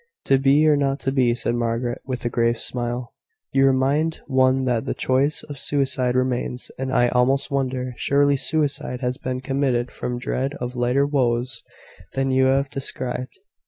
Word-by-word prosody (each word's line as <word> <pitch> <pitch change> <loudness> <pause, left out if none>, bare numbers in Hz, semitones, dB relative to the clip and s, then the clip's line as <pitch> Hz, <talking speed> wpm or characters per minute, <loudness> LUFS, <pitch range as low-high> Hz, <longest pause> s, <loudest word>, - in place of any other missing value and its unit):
"`To 135 -1 +3
be 140 +3 +4
or 150 - +5
not 140 -1 0
to 135 - 0
be,'" 125 -3 +2
said 120 -1 -2
Margaret, 120 +1 -2
with 125 -2 -4
a - - +1
grave 115 0 +1
smile. 120 +1 -3 0.4
"You 135 0 +4
remind 140 +5 +1
one 130 -1 +2
that 120 -3 0
the - - -2
choice 135 +3 +1
of 145 -3 -9
suicide 130 -3 0
remains: 125 -1 -1
and 130 0 -2
I 120 -2 +3
almost 135 +4 +1
wonder 130 -2 -2
Surely 145 0 +2
suicide 145 -3 -1
has 125 0 -2
been 130 0 -3
committed 130 -2 0
from 125 0 -4
dread 135 +3 -2
of 125 -1 -5
lighter 125 +3 +2
woes 130 -3 0 0.5
than 135 0 0
you 130 0 +3
have 135 +1 +2
described." 130 -1 -3
130 Hz, 170 wpm, -22 LUFS, 125-135 Hz, 0.5 s, or